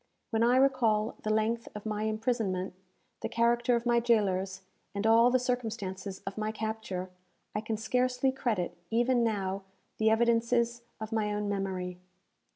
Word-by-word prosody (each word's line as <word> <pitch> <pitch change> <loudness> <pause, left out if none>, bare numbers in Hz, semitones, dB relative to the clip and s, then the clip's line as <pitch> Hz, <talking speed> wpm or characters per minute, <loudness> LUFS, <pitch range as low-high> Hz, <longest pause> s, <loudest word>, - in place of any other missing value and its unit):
When 225 -1 +1
I 240 +2 +5
recall 235 -5 +3
the 215 - -3
length 225 +2 +1
of 210 - -7
my 215 0 -1
imprisonment, 215 -4 -1 0.5
the - - -2
character 235 +1 +3
of 235 0 -1
my 240 0 +4
jailers, 195 -5 +1 0.3
and 200 +1 -2
all 230 +2 +6
the 255 - +4
circumstances 215 -6 -3
of 195 +2 -5
my 215 0 -1
capture, 220 -4 -4 0.4
I 210 - -1
can 220 0 -2
scarcely 250 +3 +1
credit, 220 -10 -1
even 240 +1 +3
now, 200 -3 -1 0.4
the 220 0 +4
evidences 235 +1 +2 0.2
of 220 +1 -6
my 215 -2 0
own 210 0 -1
memory. 190 -3 -3
220 Hz, 155 wpm, -30 LUFS, 205-235 Hz, 0.5 s, all